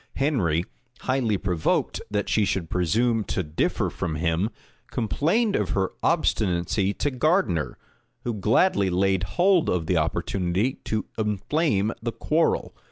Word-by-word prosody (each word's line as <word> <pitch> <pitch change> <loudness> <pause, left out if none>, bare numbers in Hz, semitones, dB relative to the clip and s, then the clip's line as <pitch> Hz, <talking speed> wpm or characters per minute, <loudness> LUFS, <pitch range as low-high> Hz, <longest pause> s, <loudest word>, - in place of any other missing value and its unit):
Henry, 95 - +1 0.4
highly 125 -6 +1
provoked 90 -4 0
that 105 -1 -1
she 110 - +2
should 95 -4 -1
presume 110 +6 +1
to 95 - -1
differ 75 0 -1
from 80 - -3
him, 85 +5 0 0.4
complained 160 - +1
of 100 -5 0
her 95 +3 0
obstinacy 95 0 +1
to 145 - -1
Gardiner, 130 - +1 0.5
who 120 - -2
gladly 105 - +2
laid 95 +1 +2 0.2
hold 180 -1 +4
of 90 -3 0
the 90 +1 +1
opportunity 90 +8 0
to 110 -2 -1
inflame 105 - +1
the 115 0 -2
quarrel. 160 +2 0
105 Hz, 130 wpm, -25 LUFS, 90-130 Hz, 0.5 s, hold